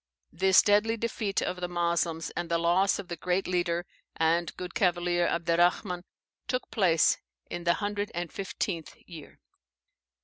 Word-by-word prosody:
This 190 +3 +5
deadly 215 +2 +3
defeat 220 -3 -1
of 180 - -2
the 180 - -1
Moslems, 170 -1 -1
and 175 -1 -4
the 170 - +2
loss 175 +4 +3
of 200 - -7
the 170 - -4
great 180 +3 -1
leader 175 -1 0 0.3
and 165 +1 +1
good 180 0 -6
cavalier 175 -1 +1
Abderrahman, 175 +2 +1 0.4
took 255 0 -2
place 175 -7 +3 0.3
in 175 - -5
the 170 - +4
hundred 205 0 -2
and 175 -1 -4
fifteenth 185 -3 -4
year. 165 -5 -11
175 Hz, 145 wpm, -28 LUFS, 170-195 Hz, 0.4 s, This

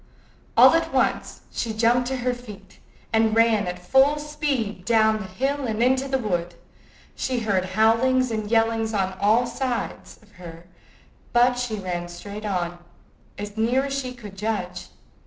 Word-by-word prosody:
All - - +8
at - - +1
once - - 0
she 225 -2 -3
jumped 240 +2 +2
to 265 - -2
her 250 0 -1
feet, 210 -6 -12 0.3
and 220 0 +3
ran 225 -3 +3
at 180 0 -4
full 265 +11 +3
speed 290 -10 -3
down 220 0 +3
the 210 - -6
hill 270 +8 -2
and 220 +1 0
into 260 +2 +2
the 265 0 0
wood. 175 -7 -2 0.6
She 255 -2 -2
heard 195 -4 0
howlings 250 +3 +3
and 215 -2 -3
yellings 225 -1 +1
on 190 -1 -1
all 220 +4 +4
sides 245 0 -4
of 210 - -23
her, 170 -1 -11 0.7
but 245 +1 +5
she 245 -3 -2
ran 180 -3 -4
straight 200 +5 -8
on, 175 -3 -2 0.6
as 205 +1 -7
near 245 +5 +2
as 275 - -4
she 270 -2 -3
could 215 -6 -11
judge. 205 -3 -3
225 Hz, 160 wpm, -24 LUFS, 200-250 Hz, 0.7 s, All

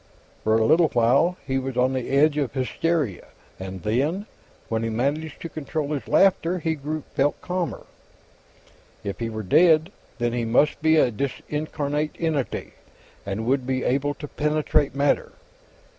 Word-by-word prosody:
For 110 0 +3
a 110 - +2
little 165 +7 +5
while, 135 +10 +3
he 135 -1 0
was 130 -1 -5
on 130 +1 +3
the 130 -2 -3
edge 145 +2 +4
of 145 -4 -1
hysteria 135 - -1 0.3
and 95 -1 -7
then, 145 - 0 0.4
when 110 -1 -1
he 115 - -1
managed 140 +7 -2
to - - -3
control 155 -1 -4
his 140 -7 -3
laughter, 185 -2 +3
he 160 -1 -1 0.4
felt 140 +2 +1
calmer. 180 -1 -3 1.2
If 100 - -5
he 115 -1 -2
were 110 -1 -5
dead, 160 - +4 0.3
then 120 -1 0
he 120 -1 -1
must 125 +8 +2
be 160 0 +4
a 125 - +4
discarnate 150 +4 -3
entity, 155 -6 -2 0.5
and 100 +3 -3
would 130 +1 +1
be 130 -1 0
able 140 +3 0
to 150 - -7
penetrate 150 -1 0
matter. 140 +1 +1
140 Hz, 155 wpm, -24 LUFS, 120-155 Hz, 1.2 s, little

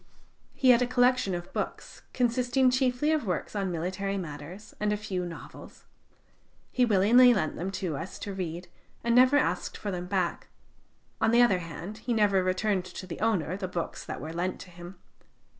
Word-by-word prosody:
He 260 -1 +5
had 240 0 +5
a 250 - +2
collection 250 -5 +2
of 175 0 -7
books, - - -5
consisting 250 +1 +2
chiefly 255 +3 +1
of 305 -8 0
works 180 +3 -3
on 195 -2 -1
military 190 +4 -2
matters 165 +3 -8
and 210 0 0
a 210 - 0
few 190 -4 -3
novels. 165 - -11 0.9
He 250 - +3
willingly 235 +4 +6
lent 155 -7 -1
them 180 +3 -3
to 185 -6 -3
us 180 - -6
to 200 - -5
read, 180 -1 -5 0.4
and 235 0 +1
never 255 +3 +6
asked - - -1
for 205 - -4
them 180 -1 -4
back; 185 -2 -1 0.7
on - - +4
the 240 +1 +6
other 195 -7 +3
hand, 175 +5 -8
he 240 +1 -2
never 205 -3 +3
returned 185 +1 0
to 185 +1 -8
the 180 - -7
owner 185 -7 0
the 190 -1 -4
books 175 -2 -4
that - - -6
were 155 +2 -6
lent 180 +2 -2
to 180 - -12
him. 175 +2 -10
195 Hz, 185 wpm, -28 LUFS, 180-240 Hz, 0.9 s, willingly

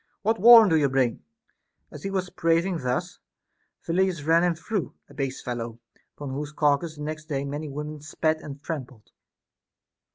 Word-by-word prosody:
What 225 +2 +1
warrant 225 -2 +9
do 160 - +5
you 145 -3 +2
bring] 130 -3 0 0.7
As 150 - -10
he 195 - -4
was 185 -2 -2
prating 165 +1 +1
thus, 125 -2 -3 0.7
Phyllidas 175 -2 0
ran 165 +2 +4
him 175 -1 +2
through, 195 +3 -4
— - - -44
a - - -15
base 135 -3 -4
fellow, 120 -2 -5 0.4
upon 145 -2 -6
whose 145 +2 -4
carcass 150 +2 +1
the 150 - -8
next 155 0 -5
day 140 -3 -3
many 145 +2 -5
women 150 +1 -6
spat 155 +1 -1
and 140 -1 -9
trampled. 130 -8 -7
155 Hz, 170 wpm, -25 LUFS, 140-170 Hz, 0.7 s, warrant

